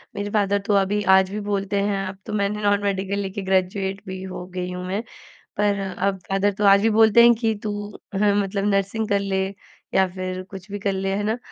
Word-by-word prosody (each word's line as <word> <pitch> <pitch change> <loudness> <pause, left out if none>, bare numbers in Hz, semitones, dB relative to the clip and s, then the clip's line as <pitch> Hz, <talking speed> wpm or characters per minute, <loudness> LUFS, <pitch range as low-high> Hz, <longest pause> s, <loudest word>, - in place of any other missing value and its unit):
मेरे 205 0 -3
फादर 200 -1 +1
तो 205 - +1
अभी 200 +1 +2 0.2
आज 190 0 +2
भी 210 - -3
बोलते 200 -1 -1
हैं 200 -1 -1
अब 190 0 -7
तो 215 - -6
मैंने 210 0 -1
नॉन 205 0 +2
मेडिकल 195 0 -1
लेके 195 0 -4
ग्रेजुएट 190 +1 0
भी 185 0 -6
हो 185 -1 -6
गई 180 0 -3
हूँ 180 0 -5
मैं। 200 +4 -1 0.6
पर 205 -1 +1
अब 195 0 -2
फादर 195 +1 +1
तो 210 - 0
आज 200 0 +7
भी 225 - +3
बोलते 220 +1 +6
हैं 235 0 +7
कि 225 -2 +1
तू 210 - -2 0.5
हाँ 205 -1 +4
मतलब 195 0 -2
नर्सिंग 200 +3 -1
कर 200 -2 +2
ले 190 -1 0 0.5
या 190 0 +4
फिर 185 0 -4
कुछ 195 0 -10
भी 205 - -4
कर 200 0 -1
ले, 195 0 -1
है 205 - -1
ना। 220 +3 -1
200 Hz, 225 wpm, -23 LUFS, 190-205 Hz, 0.6 s, आज